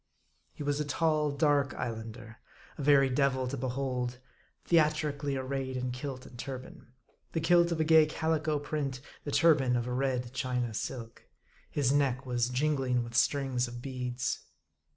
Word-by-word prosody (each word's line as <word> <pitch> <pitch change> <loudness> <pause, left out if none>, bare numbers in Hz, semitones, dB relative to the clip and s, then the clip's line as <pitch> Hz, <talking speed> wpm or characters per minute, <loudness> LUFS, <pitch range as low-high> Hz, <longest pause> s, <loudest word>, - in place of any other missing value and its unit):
He - - -7
was 145 0 0
a - - +1
tall, 150 +1 +1
dark 140 -2 +2
Islander, 115 -1 -6 0.4
a - - -7
very 140 -1 +5
devil 130 -1 +1
to 135 - -3
behold, 125 -1 -2 0.5
the 170 - +6
atrically 150 -3 +1
arrayed 130 0 -3
in 125 0 -2
kilt 130 0 -6
and 120 - -13
turban; 130 -3 -7 0.5
the 165 - +1
kilt 170 +1 +4
of 165 - -1
a - - +4
gay 160 -1 +6
calico 155 -1 0
print, 145 -3 -3 0.3
the 145 - -3
turban 140 -6 +4
of 120 -1 0
a 125 - -3
red 125 -2 -1
China 125 -2 -1
silk. 115 +1 -6 0.4
His 140 -3 +1
neck 135 -2 +1
was 120 -1 0
jingling 130 -2 +1
with 115 0 -8
strings 130 0 +2
of 120 0 -7
beads. 125 -1 -3
135 Hz, 160 wpm, -30 LUFS, 125-145 Hz, 0.5 s, the